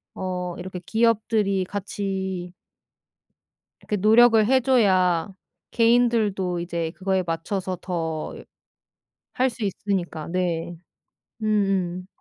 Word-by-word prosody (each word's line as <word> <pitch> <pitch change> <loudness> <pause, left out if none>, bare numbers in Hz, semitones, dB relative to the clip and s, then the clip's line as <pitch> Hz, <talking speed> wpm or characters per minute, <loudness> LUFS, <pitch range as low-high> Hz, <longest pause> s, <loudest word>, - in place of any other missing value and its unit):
어 180 -1 -4
이렇게 180 0 -6
기업들이 220 -1 +1
같이 190 -2 -4 1.4
그 210 - 0
노력을 220 +2 +6
해줘야 210 -9 +3 0.4
개인들도 230 -6 +2
이제 170 -2 -3
그거에 190 +1 -1
맞춰서 180 +3 -3
더 165 -4 -3 1.0
할 260 +1 +2
수 230 -2 -5
있으니까 185 -5 -3
네. 175 -1 -2 0.7
음음. 195 -4 0
190 Hz, 190 characters per minute, -24 LUFS, 175-215 Hz, 1.4 s, 노력을